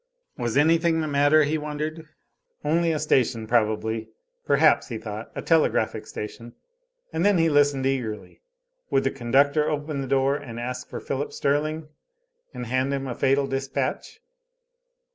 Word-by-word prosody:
Was 120 0 -2
anything 165 +2 +3
the 155 - -1
matter, 145 +2 +4
he 155 +2 0
wondered. 155 +2 -5 0.6
Only 165 +2 +2
a 155 - 0
station 130 -6 +1
probably. 110 -1 0 0.4
Perhaps, - - +4
he - - -5
thought, - - -7
a - - -5
telegraphic 165 -2 +1
station. 115 +3 -7 0.6
And 165 - 0
then 205 -1 +4
he 165 -1 +3
listened 145 -2 +3
eagerly. 125 -6 -3 0.5
Would 135 - +2
the 135 - +1
conductor 140 +4 +2
open 150 -1 -3
the 135 - -4
door 135 +1 +2
and 120 -5 -8
ask 125 +1 -5
for - - -5
Philip 140 +2 -3
Sterling, 155 +2 -1 0.6
and 125 - -6
hand 130 +3 0
him 135 0 -4
a 130 - -3
fatal 135 +2 +2
dispatch? 135 - -3
140 Hz, 150 wpm, -25 LUFS, 125-155 Hz, 0.6 s, matter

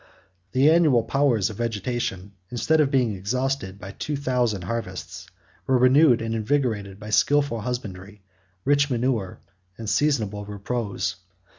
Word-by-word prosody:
57 - - -42 0.2
The 155 - +7
annual 150 -9 +4
powers 120 -5 +1
of 105 - -10
vegetation, 115 -4 -3 0.2
instead 150 +7 +2
of 145 - +2
being 125 -5 +2
exhausted 115 0 -2
by 95 0 -8
two 150 +8 -4
thousand 125 -8 0
harvests, 115 +5 -5 0.4
were 130 - +4
renewed 130 -1 +5
and 115 0 -2
invigorated 110 -4 -1
by 105 0 -8
skilful 140 +1 +2
husbandry, 105 -4 -6 0.4
rich 145 +1 +3
manure, 120 -6 -1 0.4
and 115 - -7
seasonable 110 -7 +1
repose. 105 +2 -3
115 Hz, 135 wpm, -24 LUFS, 105-135 Hz, 0.4 s, The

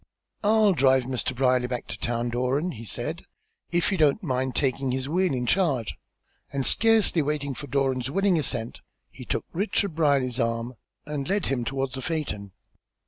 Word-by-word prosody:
"I'll 215 -1 +4
drive 130 -3 +4
Mr. 130 0 -2
Brierly 125 -1 +2
back 125 -1 -4
to - - -5
town, 120 0 -1
Doran," 130 +8 0
he 115 -4 -9
said, 100 - -3 0.5
"if 175 +3 +2
you 190 - -1
don't 155 +7 +3
mind 130 -4 -1
taking 135 0 0
his 130 +1 -1
wheel 180 +4 +1
in 125 -2 -1
charge;" 135 - +1 0.6
and 135 -1 -1
scarcely 225 -7 +4
waiting 145 -1 -2
for 145 +3 -7
Doran's 130 -2 0
willing 195 +2 +2
assent, 120 -5 -3 0.3
he - - -10
took - - -2
Richard 200 0 0
Brierly's 140 -5 +2
arm 115 +1 -1 0.3
and 150 0 -4
led 200 0 +1
him 130 -3 -1
toward 135 +1 -2
his 130 0 -5
phaeton. 135 - -3
135 Hz, 170 wpm, -26 LUFS, 125-165 Hz, 0.6 s, I'll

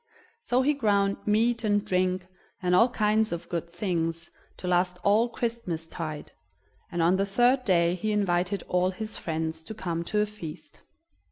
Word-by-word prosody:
So 255 - +1
he 295 +3 +3
ground 200 -7 +2
meat 230 +3 +2
and 205 -1 +1
drink, 185 -1 0 0.3
and 180 -2 0
all 230 +7 +6
kinds 215 -1 +2
of 170 -1 -4
good 170 -1 -3
things, 170 -2 -2 0.3
to 180 - -6
last 180 0 +2
all 215 +4 +4
Christmas 230 -10 -3
tide, 160 -2 -6 0.6
and 170 -1 0
on 175 +3 +4
the 195 - +1
third 245 +6 +3
day 170 -3 +3
he 215 +4 -2
invited 190 -2 0
all 180 0 +2
his 215 +3 -5
friends 160 -1 -3
to 220 - -7
come 170 -5 -3
to 210 - 0
a 210 - +3
feast. 205 -7 -10
190 Hz, 170 wpm, -27 LUFS, 170-215 Hz, 0.6 s, all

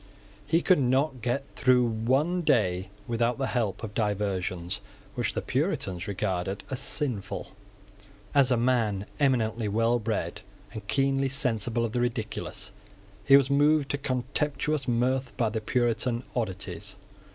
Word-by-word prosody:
He 165 +3 +2
could 185 -5 +5
not 130 0 +1
get 125 +4 -1
through 125 -1 +4
one 130 +10 +1
day 95 - +2 0.2
without 120 0 +1
the 135 - 0
help 115 -5 -1
of 105 -2 -5
diversions 95 -5 -1 0.3
which - - -2
the - - -2
Puritans 90 +1 -1
regarded 95 -1 -2
as 130 - -2
sinful. 130 -7 -2 0.8
As 140 -3 +5
a 125 - +3
man 115 -5 +1
eminently 115 -5 +1
well 115 +3 +2
bred, 110 -1 -2 0.3
and 105 -2 -7
keenly 135 +2 +2
sensible 120 -4 0
of 115 - -3
the 120 +1 0
ridiculous, 110 -3 -3 0.5
he 135 +7 +8
was 140 -1 +2
moved 145 0 +3
to 140 - -1
contemptuous 140 +2 -1
mirth 125 +2 0
by 115 -2 +2
the 110 0 -3
Puritan 120 +1 0
oddities. 95 -4 -3
120 Hz, 140 wpm, -28 LUFS, 105-135 Hz, 0.8 s, he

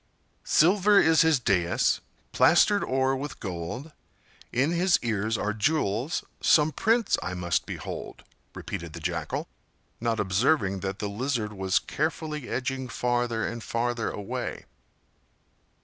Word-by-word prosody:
"Silver 200 +5 +5
is 160 -1 +5
his 160 -4 +4
dais, 90 -7 +1 0.3
plastered 200 +4 +4
o'er 130 +1 +1
with 145 +3 -6
gold; 95 - -5 0.6
In 135 +6 +1
his 175 +1 +3
ears 110 -1 0
are 105 +1 -1
jewels,—some 150 - +1
prince 225 +6 +2
I 90 - -4
must 85 -1 -1
behold!" - - -7 0.3
repeated 85 -2 -6
the 85 - -7
Jackal, 85 +1 -3 0.5
not 115 -1 -1
observing 100 +1 +1
that 95 0 -4
the 105 - -3
Lizard 110 0 -2
Was 95 -1 0
carefully 150 -2 -3
edging 130 0 -3
farther 120 -1 0
and 115 0 -4
farther 120 0 -1
away. 100 -1 -5
120 Hz, 120 wpm, -27 LUFS, 100-150 Hz, 0.6 s, Silver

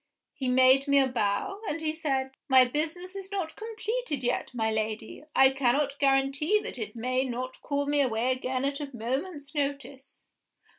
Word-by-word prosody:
He 270 -3 -4
made 260 +2 +5
me 280 0 +4
a 275 - +6
bow, 245 - -1
and 325 - -2
he 310 -1 -1
said, 270 -4 -1 0.2
'My 260 -1 +7
business 330 +8 -3
is 390 0 -6
not 345 -6 -3
completed 445 - -3
yet, 245 - -1
my 220 -3 -1
Lady. 220 +5 -3
I 265 0 +7
cannot 275 +2 +1
guarantee 275 +7 +2
that - - -7
it 430 - -5
may 255 +3 0
not 255 0 -5
call 285 -1 -1
me 290 0 +2
away 245 -1 +1
again 255 +1 -1
at 280 0 -1
a 290 -2 -5
moment's 280 +5 -4
notice. 280 -2 -5
275 Hz, 170 wpm, -28 LUFS, 255-300 Hz, 0.2 s, My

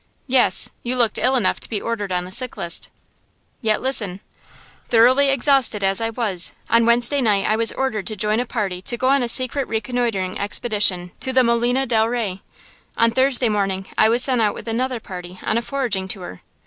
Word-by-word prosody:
"Yes, 255 -2 +3
you 245 +1 -3
looked 235 -4 0
ill 260 +2 +1
enough 225 -7 0
to - - -7
be 215 - -2
ordered 210 -4 -4
on 180 0 -2
the 180 - -11
sick 250 +5 0
list." 170 -3 -2 0.7
"Yet, 220 -1 0
listen. 210 -8 +1 0.7
Thoroughly 255 +5 +4
exhausted 270 -6 +3
as 195 +2 +3
I 225 - -1
was, 205 -7 -1 0.2
on 230 0 +3
Wednesday 240 +4 +3
night 205 -5 +1
I 215 - +1
was 225 +1 +2
ordered 220 -8 -3
to 215 - -4
join 210 +2 0
a 245 - -1
party 195 -7 -3
to 240 +5 0
go 260 +1 0
on 275 0 +3
a 245 - -1
secret 255 +3 +3
reconnoitering 225 -5 -3
expedition 200 -4 0
to 260 - -2
the 260 0 +4
Molina 240 +3 +1
del 225 -3 +1
Rey. 215 -6 -3 0.6
On 230 0 +3
Thursday 260 0 +3
morning 195 -3 -2
I 220 - +4
was 240 +2 +1
sent 255 -3 +1
out 210 -2 0
with - - -10
another 250 +2 -2
party 180 -3 -9
on - - -1
a 235 - +1
foraging 235 -8 -2
tour. 180 - -7
230 Hz, 200 wpm, -20 LUFS, 200-250 Hz, 0.7 s, Thoroughly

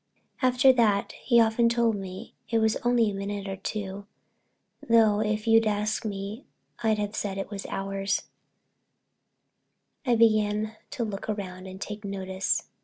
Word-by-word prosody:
After 255 0 +5
that—he's 230 +1 +3
often 225 +1 +3
told 235 -1 +2
me 195 +2 -7 0.2
it 230 - +2
was 220 -1 +2
only 240 -3 +2
a - - -6
minute 200 0 -4
or 195 - -3
two, 200 0 -5 0.8
though 220 -3 +5
if 215 0 -1
you'd 225 -1 +5
asked 210 +2 -1
me 200 +4 -5 0.4
I'd 220 -2 +2
have 210 0 -3
said 195 -2 -3
it 195 +1 -5
was 195 -1 -5
hours—I 195 +5 -6
began 215 -1 +2
to 260 -5 -3
look 205 -3 -5
round 190 -3 -5
and 190 0 -9
take 210 +1 -6
notice. 190 -1 -1
210 Hz, 140 wpm, -27 LUFS, 195-225 Hz, 0.8 s, After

